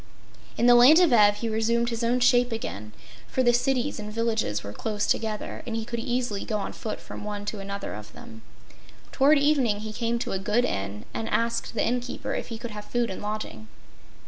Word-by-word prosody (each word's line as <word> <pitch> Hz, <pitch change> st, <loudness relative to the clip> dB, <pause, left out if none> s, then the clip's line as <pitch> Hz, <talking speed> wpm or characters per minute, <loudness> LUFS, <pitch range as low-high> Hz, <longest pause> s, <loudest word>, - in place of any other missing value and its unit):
In 235 Hz, -, +2 dB
the 245 Hz, -, +8 dB
land 255 Hz, +7 st, +8 dB
of 345 Hz, -8 st, +4 dB
Ev 205 Hz, -2 st, +6 dB
he 230 Hz, -, -3 dB
resumed 230 Hz, +2 st, +1 dB
his 230 Hz, 0 st, -3 dB
own 240 Hz, +2 st, +2 dB
shape 245 Hz, 0 st, +4 dB
again, 105 Hz, -, -5 dB, 0.4 s
for 260 Hz, -, 0 dB
the 240 Hz, -1 st, +4 dB
cities 250 Hz, -1 st, 0 dB
and 210 Hz, 0 st, -6 dB
villages 220 Hz, -, -1 dB
were 100 Hz, -, -7 dB
close 210 Hz, -, -2 dB
together 220 Hz, -2 st, -2 dB
and 230 Hz, -, -3 dB
he 225 Hz, -1 st, -3 dB
could 235 Hz, 0 st, -4 dB
easily 240 Hz, -4 st, -2 dB
go 215 Hz, -, -2 dB
on 200 Hz, -, -4 dB
foot 215 Hz, -, -5 dB
from -, -, -9 dB
one 205 Hz, -1 st, -5 dB
to 210 Hz, 0 st, -4 dB
another 200 Hz, 0 st, -5 dB
of 105 Hz, 0 st, -9 dB
them. 235 Hz, -2 st, -12 dB, 0.7 s
Toward 285 Hz, +3 st, +5 dB
evening 275 Hz, -8 st, +2 dB
he 215 Hz, 0 st, -6 dB
came 235 Hz, +1 st, -1 dB
to 235 Hz, -, -3 dB
a 190 Hz, -, -1 dB
good 210 Hz, +5 st, +1 dB
Inn 100 Hz, -, -4 dB
and 225 Hz, -, -3 dB
asked 230 Hz, 0 st, -1 dB
the 210 Hz, -, +1 dB
inn 250 Hz, +1 st, +1 dB
keeper 245 Hz, +1 st, -5 dB
if -, -, -3 dB
he 230 Hz, -, -6 dB
could 235 Hz, +1 st, -7 dB
have 210 Hz, 0 st, -8 dB
food 240 Hz, -2 st, -1 dB
and 190 Hz, -, -6 dB
lodging. 210 Hz, -, -5 dB
225 Hz, 220 wpm, -26 LUFS, 210-240 Hz, 0.7 s, the